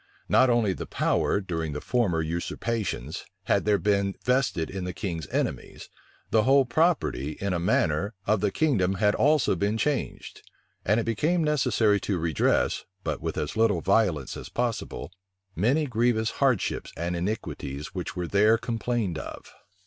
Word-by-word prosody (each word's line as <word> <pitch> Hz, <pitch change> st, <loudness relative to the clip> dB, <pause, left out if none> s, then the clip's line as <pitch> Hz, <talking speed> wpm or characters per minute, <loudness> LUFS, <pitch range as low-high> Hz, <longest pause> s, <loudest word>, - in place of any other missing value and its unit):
Not 130 Hz, -, +5 dB
only 115 Hz, -5 st, +2 dB
the -, -, -6 dB
power, -, -, +1 dB
during 80 Hz, -5 st, -3 dB
the 75 Hz, -, -3 dB
former 90 Hz, -6 st, 0 dB
usurpations, 85 Hz, -, -3 dB, 0.2 s
had 95 Hz, +1 st, +1 dB
there 105 Hz, -1 st, +4 dB
been 100 Hz, -1 st, +1 dB
vested 125 Hz, -, +1 dB
in 95 Hz, -1 st, -5 dB
the 90 Hz, 0 st, -4 dB
king's 85 Hz, -6 st, -4 dB
enemies; -, -, -3 dB, 0.4 s
the 110 Hz, -, +4 dB
whole 135 Hz, +3 st, +4 dB
property, 125 Hz, -, +1 dB
in 100 Hz, -1 st, -3 dB
a 85 Hz, -, 0 dB
manner, 90 Hz, +1 st, +1 dB
of 105 Hz, -1 st, +2 dB
the 105 Hz, -, +2 dB
kingdom 95 Hz, -, +1 dB
had 105 Hz, +1 st, +2 dB
also 150 Hz, -7 st, +3 dB
been 100 Hz, +4 st, 0 dB
changed: 145 Hz, +3 st, -2 dB, 0.4 s
and 105 Hz, +4 st, +2 dB
it -, -, 0 dB
became 160 Hz, -, +1 dB
necessary 120 Hz, -8 st, +2 dB
to 100 Hz, -2 st, -2 dB
redress, 80 Hz, -3 st, +1 dB, 0.2 s
but -, -, -3 dB
with -, -, -3 dB
as 75 Hz, -, -3 dB
little 110 Hz, -6 st, +2 dB
violence 95 Hz, -8 st, +1 dB
as -, -, -8 dB
possible, 120 Hz, -6 st, -3 dB, 0.4 s
many 130 Hz, -, +2 dB
grievous 115 Hz, -3 st, +1 dB
hardships 130 Hz, -8 st, +1 dB
and 85 Hz, +1 st, -2 dB
iniquities 85 Hz, -7 st, -4 dB
which 95 Hz, 0 st, -5 dB
were 90 Hz, -1 st, -2 dB
there 105 Hz, +5 st, +4 dB
complained 115 Hz, -6 st, -2 dB
of. -, -, -9 dB
105 Hz, 155 wpm, -26 LUFS, 90-120 Hz, 0.4 s, Not